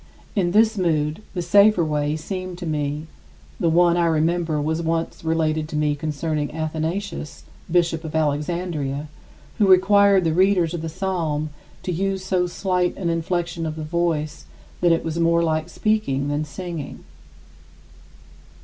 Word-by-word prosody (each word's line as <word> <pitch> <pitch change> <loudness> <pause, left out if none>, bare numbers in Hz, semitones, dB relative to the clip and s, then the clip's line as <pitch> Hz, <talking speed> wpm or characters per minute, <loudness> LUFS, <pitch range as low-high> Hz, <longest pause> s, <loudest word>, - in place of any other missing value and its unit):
In 185 -4 +2
this 220 +2 +3
mood, 155 -1 0
the 175 - -1
safer 200 0 +5
way 150 -1 0
seemed 185 +3 -5
to 175 - -6
me 150 -1 -2 0.5
the 165 - +2
one 170 +1 +4
I 170 -1 +3
remember 165 0 +1
was 160 +3 -1
once 165 0 -2
related 160 -1 0
to - - -5
me 150 -1 +1
concerning 150 0 -2
Athanasius, 160 +2 -3 0.3
bishop 170 -1 +1
of 160 -1 -6
Alexandria, 150 -1 -1 0.5
who 205 - +4
required 195 +1 +5
the 165 -1 +1
readers 180 -2 +3
of 170 - -3
the 165 - -4
psalm 160 -4 -2 0.3
to 180 - -2
use 190 +2 -1
so 180 -2 +1
slight 180 0 -1
an 175 -3 -1
inflection 165 0 -2
of 155 - -4
the 160 - -5
voice 155 - -1 0.4
that 175 -1 +4
it 165 - +2
was 165 0 -3
more 170 0 +3
like 155 0 0
speaking 175 -10 0
than 145 +1 -1
singing. 165 0 -7
165 Hz, 150 wpm, -22 LUFS, 155-180 Hz, 0.5 s, safer